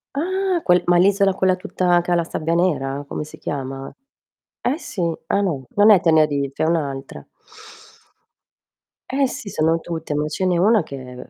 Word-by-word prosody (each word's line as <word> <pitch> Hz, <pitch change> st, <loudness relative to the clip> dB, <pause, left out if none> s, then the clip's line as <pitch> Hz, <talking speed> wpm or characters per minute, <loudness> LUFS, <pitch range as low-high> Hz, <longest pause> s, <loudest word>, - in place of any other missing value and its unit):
Ah, 370 Hz, +3 st, -1 dB
quel 180 Hz, 0 st, +3 dB
ma 175 Hz, 0 st, +4 dB
l'isola 195 Hz, +1 st, +3 dB
quella 185 Hz, -1 st, +2 dB
tutta 180 Hz, -2 st, +1 dB
che 175 Hz, -, -4 dB
ha -, -, +4 dB
la 170 Hz, -, +1 dB
sabbia 165 Hz, 0 st, -3 dB
nera? 145 Hz, -6 st, 0 dB
Come 150 Hz, -, -4 dB
si 150 Hz, -, -13 dB
chiama? 135 Hz, -1 st, -5 dB, 0.7 s
Eh 265 Hz, +5 st, 0 dB
sì. 225 Hz, -, -6 dB, 0.3 s
Ah 200 Hz, -, +1 dB
no, 155 Hz, -10 st, -2 dB
non 205 Hz, +2 st, +6 dB
è 200 Hz, -, +7 dB
Tenerife, 150 Hz, -5 st, +1 dB
è -, -, +3 dB
un'altra. 140 Hz, -5 st, -3 dB, 1.8 s
Eh 270 Hz, +1 st, +1 dB
sì, 220 Hz, -, -7 dB
sono 165 Hz, -1 st, +1 dB
tutte, 165 Hz, -2 st, -5 dB
ma 150 Hz, +1 st, -1 dB
ce 185 Hz, +5 st, -2 dB
n'è 180 Hz, -1 st, +2 dB
una 210 Hz, +4 st, +4 dB
che 145 Hz, -3 st, -8 dB
è 125 Hz, 0 st, -11 dB
175 Hz, 175 wpm, -21 LUFS, 150-195 Hz, 1.8 s, è